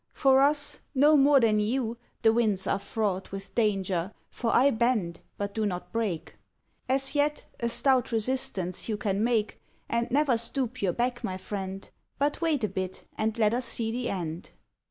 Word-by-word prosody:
For 270 -1 +4
us, 290 +1 +2
no 295 +3 +6
more 280 0 +6
than 220 -3 +3
you, 230 +2 -1 0.3
the 225 -1 +5
winds 215 -5 +1
are 195 - 0
fraught 200 -2 -2
With 195 0 -7
danger, 195 -5 0 0.2
for 230 -2 -2
I 275 +3 +5
bend, 220 -8 0 0.2
but 200 0 -4
do 220 - -1
not 180 -4 -3
break. 215 -8 -3 0.5
As 270 +1 +1
yet, 295 0 0
a 235 - -1
stout 255 0 +2
resistance 220 -6 -1
you 215 - -1
can 205 -2 -1
make, 225 -3 0 0.3
And 235 0 -1
never 275 -3 +2
stoop 250 0 0
your 190 -3 +1
back, 245 0 -1
my 185 - -3
friend; 190 0 -6 0.3
But 285 +3 0
wait 310 -7 +1
a - - +3
bit, 185 -1 -5
and 220 +1 -1
let 215 -1 +3
us 245 +1 +1
see 225 -1 +1
the 240 +1 -2
end." 170 -3 -4
225 Hz, 175 wpm, -28 LUFS, 195-255 Hz, 0.5 s, no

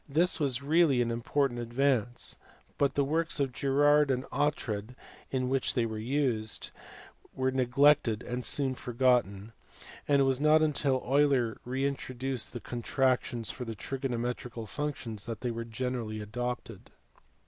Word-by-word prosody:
This 170 +5 +2
was 140 -3 0
really 155 -3 +4
an 115 - -2
important 120 +2 0
advance, 120 0 0 0.4
but 140 -1 +2
the 140 - +3
works 160 +2 0
of 135 -2 +1
Girard 145 +2 +3
and 130 0 0
Oughtred, 125 -5 -1 0.3
in 130 -1 -1
which 130 0 0
they 120 -3 +2
were 110 -1 -4
used, 115 -3 -1 0.6
were 130 0 +1
neglected 130 -2 +3
and 125 +1 -4
soon 130 +3 +1
forgotten, 120 -5 +1 0.6
and 140 -1 +4
it - - +5
was 135 0 +1
not 155 +1 +5
until 140 -4 +1
Euler 135 -4 +2
reintroduced 130 -1 -3
con 120 -1 -5
tractions 125 -3 0
for 125 - -6
the 115 -2 -5
trigonometrical 125 -1 -4
functions 120 -4 -5
that 115 -2 -5
they 125 - -1
were 115 0 -4
generally 115 -2 -3
adopted. 120 +3 -5
130 Hz, 140 wpm, -30 LUFS, 120-140 Hz, 0.6 s, it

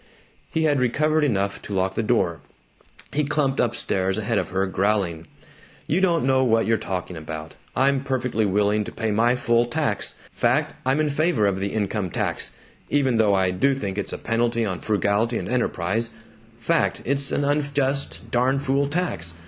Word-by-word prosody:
He 160 - 0
had 145 -3 +3
recovered 150 +5 +2
enough 100 -7 0
to 100 - -6
lock 95 0 +1
the 115 - -1
door; 105 -7 +1 0.7
he 150 - +1
clumped 140 -2 0
up 120 -1 +1
stairs 95 0 -1
ahead 110 0 0
of - - -3
her, 95 0 0
growling, 95 -4 0 0.6
"You 175 +6 +1
don't 170 -6 +2
know 130 0 +3
what 115 -2 +3
you're 115 0 +2
talking 90 -1 -4
about. 80 0 -7 0.2
I'm 135 +1 +2
perfectly 130 -4 -1
willing 105 +2 +2
to - - -7
pay 110 -1 -2
my 115 +4 +3
full 120 -1 +2
tax 120 - -1 0.2
fact, - - +1
I'm 135 +3 +2
in 150 -1 +1
favor 145 -7 +2
of 95 -1 +1
the 100 0 -2
income 105 -2 -1
tax - - -1 0.4
even 135 -5 +2
though 105 -3 +4
I 95 -1 +2
do 135 +10 +2
think 100 -6 -3
it's 100 - -3
a - - -4
penalty 115 0 0
on 95 -4 -3
frugality 105 +4 +1
and - - -4
enterprise 115 -2 -1 0.5
fact, 165 +7 0
it's 140 0 0
an 145 - 0
unjust, 140 -1 0
darn 125 +3 +2
fool 140 +1 +1
tax. 145 - -2
115 Hz, 180 wpm, -23 LUFS, 100-140 Hz, 0.7 s, though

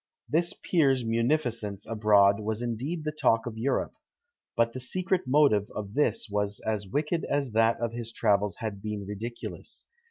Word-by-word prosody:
This 170 +3 +1
peer's 135 -8 +2
munificence 115 -4 0
abroad 105 -2 +4
was 110 +2 -2
indeed 130 +8 -3
the 155 - -1
talk 115 -6 +2
of 120 -2 -5
Europe; 120 +5 -1 0.6
but 115 0 +2
the 130 - -5
secret 185 +5 -1
motive 130 -7 +4
of 100 -1 -5
this 150 -2 +1
was 105 -1 -1
as 105 -2 -2
wicked 150 - -1
as 140 -3 -1
that 115 +1 +3
of 115 -1 -2
his 115 -1 -5
travels 105 -2 +1
had 105 -3 -5
been 105 -1 -4
ridiculous. 110 +4 -6
115 Hz, 160 wpm, -28 LUFS, 105-140 Hz, 0.6 s, abroad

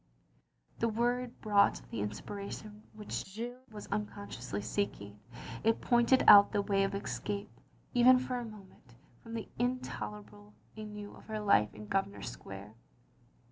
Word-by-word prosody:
The 230 - +2
word 240 +2 -1
brought 205 -2 +4
the 115 - -3
inspiration 200 - -6
which 215 -1 -4
Jeanne 235 +6 -6
was 210 -1 -8
unconsciously 200 - -4
seeking; 105 - -3 0.4
it 225 0 +3
pointed 240 +2 +4
out 200 0 +10
the 200 - +2
way 195 -1 +2
of 195 0 -1
escape, 200 +1 -4 0.4
even 250 +1 +7
for 250 0 -2
a - - -4
moment, 195 - -13 0.3
from 230 0 -8
the 225 - -4
in 250 +1 +1
tolerable 105 - -8 0.2
ennui 210 -1 -7
of 205 - -13
her 215 -1 -4
life 155 - +4
in 105 0 -9
Grosvenor 195 - -1
Square. 100 -3 -8
205 Hz, 140 wpm, -32 LUFS, -, 0.4 s, out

